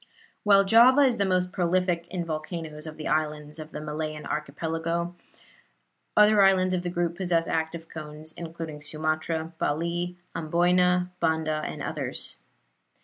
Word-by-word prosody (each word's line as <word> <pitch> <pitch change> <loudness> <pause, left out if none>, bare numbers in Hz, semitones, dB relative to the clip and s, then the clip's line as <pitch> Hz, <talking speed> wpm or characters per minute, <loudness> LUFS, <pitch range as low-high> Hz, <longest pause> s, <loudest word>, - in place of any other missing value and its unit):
While 200 -1 +6
Java 240 +7 +7
is 255 -4 +4
the 200 - +2
most 180 -1 +1
prolific 180 -2 0
in 180 -2 -3
volcanoes 155 -1 -5
of 155 - -8
the 155 - -5
islands 150 +1 -1
of 155 0 -8
the - - -5
Malayan 155 0 -4
Archipelago, 165 +3 -2 1.0
other 210 0 +7
islands 185 -1 +4
of 180 - 0
the 175 - -3
group 175 -1 -1
possess 170 -2 +1
active 160 +1 -2
cones, 155 0 -7
including 165 -3 -7
Sumatra, 155 +2 -2
Bali, 170 +4 -1 0.2
Amboyna, 180 +2 +2
Banda 160 -2 0
and - - -6
others. - - -4
165 Hz, 140 wpm, -27 LUFS, 155-180 Hz, 1.0 s, Java